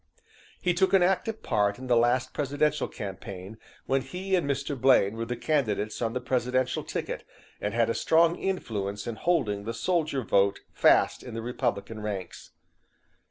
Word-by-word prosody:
"He 180 - +1
took 190 +2 +2
an 190 -2 +6
active 195 +4 0
part 100 -1 +1
in 130 - -8
the 125 -1 +3
last 120 +2 +2
presidential 145 +1 0
campaign, 95 +1 -8 0.3
when 135 0 +1
he 180 +9 -5
and 170 -6 0
Mr. 140 +1 -1
Blaine 120 -5 +4
were 115 0 -4
the 125 - -2
candidates 115 -7 -1
on 115 -1 0
the 125 - -1
presidential 130 0 0
ticket, - - -4 0.4
and 105 +2 -2
had 115 -1 +3
a 115 - 0
strong 165 +5 +3
influence 105 - -3
in 120 -2 -4
holding 110 - 0
the 115 0 -3
soldier 155 -1 0
vote 100 -1 +2
fast - - +4
in 120 -3 -8
the 115 - -3
Republican 115 -3 -2
ranks." 100 -3 -5
125 Hz, 165 wpm, -28 LUFS, 105-150 Hz, 0.4 s, an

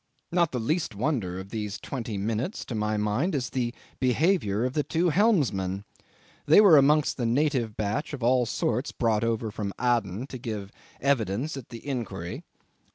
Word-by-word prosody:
Not 170 -2 +2
the 130 - -2
least 140 - -1
wonder 105 - -1
of 95 +1 -8
these 105 -2 -4
twenty 115 0 -5
minutes, 115 - -2
to - - -6
my 105 -1 0
mind, 105 - 0
is 130 -3 -2
the 120 -2 -1 0.3
behaviour 125 - +2
of 130 - -2
the 150 - +2
two 170 +4 +1
helmsmen. 115 - +2 0.6
They - - +8
were 200 -6 +8
amongst 150 +1 +4
the 120 - -1
native 125 -3 +1
batch 110 +7 -2
of 135 -5 -6
all 125 0 +3
sorts 125 +5 -1
brought 115 -3 +1
over 115 -1 -1
from 100 -1 -4
Aden 120 -3 0
to 130 - -7
give 105 -5 -5 0.3
evidence 130 +1 0
at 135 -4 -8
the 115 -2 -10
inquiry. 100 -10 -4
120 Hz, 170 wpm, -27 LUFS, 105-140 Hz, 0.6 s, They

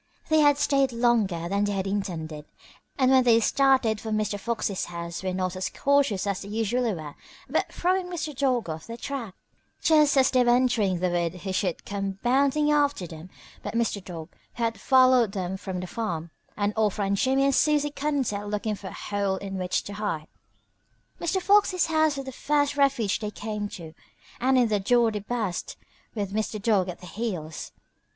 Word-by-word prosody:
They 315 0 +4
had 290 -1 +5
stayed 275 -2 +2
longer 225 -8 +1
than 200 +3 +1
they 205 - -1
had 190 -1 -2
intended, 165 -7 -4 0.5
and 260 -2 +3
when 260 -1 +6
they 230 -2 +5
started 255 -3 +2
for 220 - -5
Mr. 215 -1 -1
Fox's 215 -3 -2
house 170 -1 -6
were 190 -1 -2
not 185 0 -2
as 185 0 -2
cautious 280 -9 +1
as 200 -1 -2
they 200 - -8
usually 225 +2 0
were 155 -6 -6 0.3
about - - -1
throwing 365 +1 0
Mr. 315 -4 -4
Dog 255 -5 +1
off 160 0 -6
their 230 0 -7
track. 240 -7 -5 0.4
Just 300 -3 +4
as 265 -1 +5
they 255 -1 +4
were 240 0 +4
entering 220 -8 +1
the 180 -1 +1
wood 175 0 -1
who 190 -1 -4
should 185 -2 -1
come 195 -1 -3
bounding 280 +4 +3
after 285 -9 +2
them 160 +1 -10 0.3
but - - -6
Mr. 225 -4 0
Dog, 165 -3 -8 0.3
who 235 - -3
had 225 -3 -1
followed 255 -5 +5
them 190 -2 -3
from 190 -1 -5
the 180 - -4
farm, 170 -6 -4 0.3
and 205 0 0
off 215 -3 +1
ran 200 -1 0
Jimmie 265 +6 +2
and 275 - +3
Susie 295 +1 +2
Cottontail 275 -9 -2
looking 210 +1 -2
for 200 -1 -8
a - - -7
hole 200 -2 -2
in 195 0 -5
which 180 0 -1
to 205 - -7
hide. 200 -7 -3 0.9
Mr. 345 +3 0
Fox's 395 -2 +3
house 315 -2 +2
was 275 - -5
the 265 - -6
first 290 +2 0
refuge 275 -8 +2
they 210 - -3
came 210 0 -4
to, 160 -5 -9 0.5
and 260 +1 +3
in 245 -2 +4
the 210 -2 +1
door 235 +3 +3
they 210 - -3
burst, 210 -3 -3 0.4
with 200 -2 -3
Mr. 215 0 -2
Dog 200 -3 +2
at 180 - -7
their 180 - -10
heels. 180 -9 -4
215 Hz, 195 wpm, -26 LUFS, 190-265 Hz, 0.9 s, when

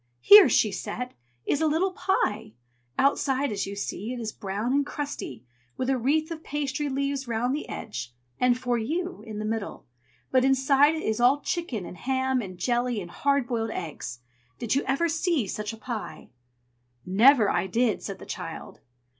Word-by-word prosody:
"Here," 405 -7 +9
she 215 -2 +3
said, 225 +5 -5 0.3
"is 285 - 0
a 320 - +3
little 335 +5 +1
pie! 220 - -1 0.4
Outside, 275 -1 +2
as 200 -2 -2
you 200 - -5
see, 205 +2 -4
it 250 - -5
is 220 -2 -3
brown 205 +6 -3
and 285 +1 +3
crusty, 280 - -6 0.3
with 260 +1 0
a 265 - +2
wreath 310 +6 +1
of 320 -1 -6
pastry 290 0 -2
leaves 275 0 -2
round 240 +2 0
the 300 - -4
edge 125 - -6 0.3
and 250 -1 +3
'For 245 -2 -1
You' 335 - -3
in 215 -1 -6
the 215 - -3
middle; 220 -1 -4 0.5
but 255 -1 +4
inside 270 +3 +4
it 315 - -4
is 220 +2 -1
all 265 +4 +4
chicken 335 - -3
and 180 - -9
ham 260 +1 0
and 185 -4 -8
jelly 240 +3 0
and 175 -3 -8
hard 280 +2 +1
boiled 230 -2 -2
eggs. 150 - -6 0.4
Did 235 +1 -1
ever 275 +5 +1
you - - +1
see 325 - +1
such 210 +2 -4
a 225 - -9
pie?" 225 -1 -6 0.7
"Never 220 +5 +6
I - - 0
did!" 225 +3 +1
said - - -6
the - - -11
child. - - -7
250 Hz, 180 wpm, -26 LUFS, 215-280 Hz, 0.7 s, Here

